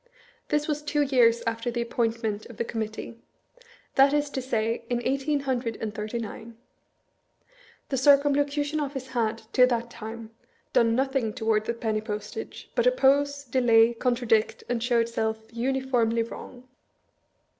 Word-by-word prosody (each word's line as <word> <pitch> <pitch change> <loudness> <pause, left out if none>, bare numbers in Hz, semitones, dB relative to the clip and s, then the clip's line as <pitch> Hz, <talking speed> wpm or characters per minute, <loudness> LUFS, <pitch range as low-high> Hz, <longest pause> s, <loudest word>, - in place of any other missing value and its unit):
This 295 0 0
was 300 -1 -1
two 295 0 +1
years 240 -4 +3
after 230 +1 -2
the 235 0 -1
appoint 230 -1 -1
ment 215 -1 -2
of 235 - -12
the - - 0
Committee; 225 +1 -5 0.7
that 275 +1 +5
is 295 -1 0
to 265 - -3
say, 230 -3 -1
in 240 -1 0
eighteen 275 +2 0
hundred 250 -4 -2
and 215 -2 -4
thirty 215 +2 -4
nine. 230 0 -7 1.3
The 270 - -1
Circumlocution 285 +2 +3
Ofllce 270 -3 -4
had, 225 -3 0 0.2
to 250 0 +6
that 235 -1 -2
time, 225 0 -8 0.4
done 230 -1 +4
nothiag 265 -4 0
toward 220 -3 +1
the 235 - -2
penny 220 -2 -1
postage, 210 - -6
but - - +2
oppose, 285 - +3
delay, 235 -3 +4
contradict, 235 -2 +1
and 240 -1 -1
show 240 0 +2
itself 225 -1 0 0.2
uniformly 240 -2 +1
wrong. 245 +2 -10
240 Hz, 145 wpm, -26 LUFS, 225-270 Hz, 1.3 s, to